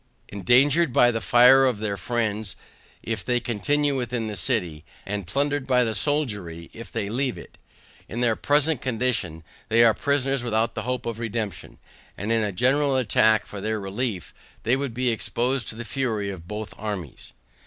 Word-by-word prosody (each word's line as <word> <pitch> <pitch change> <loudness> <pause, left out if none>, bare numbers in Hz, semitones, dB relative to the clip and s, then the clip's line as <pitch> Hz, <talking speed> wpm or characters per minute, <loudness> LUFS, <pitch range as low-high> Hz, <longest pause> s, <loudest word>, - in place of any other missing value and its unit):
Endangered 130 - +3
by 120 0 +5
the 115 -1 -3
fire 125 +4 +6
of 125 -4 +2
their 105 -1 -2
friends 110 -3 -2 0.5
if 110 -4 -3
they 120 +6 +1
continue 140 +6 0
within 125 -3 -2
the 105 -1 -4
city, 85 -3 -1 0.2
and 100 -2 -4
plundered 140 +4 -1
by 125 -2 +4
the 110 -2 -1
soldiery 105 - -2
if 115 - -10
they 100 - -2
leave 125 +4 -1
it. - - -13 0.5
In 115 - -4
their 120 -2 +2
present 145 0 +1
condition 115 -10 -2 0.3
they 115 +1 +5
are 115 -2 +6
prisoners 135 -1 0
without 115 0 0
the - - -4
hope 125 -1 -2
of 115 -1 -4
redemption, 110 -5 -4 0.4
and 105 +4 -3
in 115 -1 +3
a 105 -1 -1
general 135 +7 +2
attack 110 -4 +3
for 100 - -8
their 110 +1 -1
relief, 100 0 -4 0.3
they 120 +3 +3
would 135 -3 -3
be 125 0 +1
exposed 120 +4 -1
to - - -6
the 120 +1 -7
fury 110 -7 -2
of 85 -3 -10
both 105 +1 -6
armies. 100 - -6
115 Hz, 175 wpm, -24 LUFS, 105-130 Hz, 0.5 s, fire